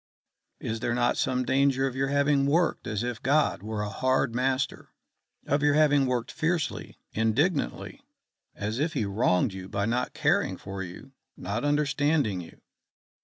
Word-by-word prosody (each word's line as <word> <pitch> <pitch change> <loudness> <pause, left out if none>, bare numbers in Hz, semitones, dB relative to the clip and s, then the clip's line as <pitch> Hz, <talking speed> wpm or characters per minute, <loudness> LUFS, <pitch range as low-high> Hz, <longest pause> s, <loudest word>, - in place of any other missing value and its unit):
Is 110 0 -3
there 120 +1 -1
not 120 0 +2
some 130 -4 0
danger 135 0 +2
of 130 -2 -3
your 135 +1 0
having 140 0 +2
worked 165 +5 +1
as 110 0 -2
if 120 -2 -4
God 145 -2 +2
were 105 0 -3
a 105 - -3
hard 130 +2 +1
master? 130 +2 -1 0.6
of 145 +2 +1
your 145 0 +3
having 145 -3 +4
worked 125 -2 -1
fiercely, 165 0 -2 0.2
indignantly, 115 - 0 0.5
as 105 +4 -3
if 155 +2 0
he 120 -7 0
wronged 100 -2 +1
you 95 0 -8
by 100 0 -1
not 125 +3 -1
caring - - +1
for 95 0 -7
you, 90 +9 -9 0.3
not 100 +6 -3
understanding 145 - +1
you?" 85 - -14
130 Hz, 160 wpm, -27 LUFS, 110-145 Hz, 0.6 s, having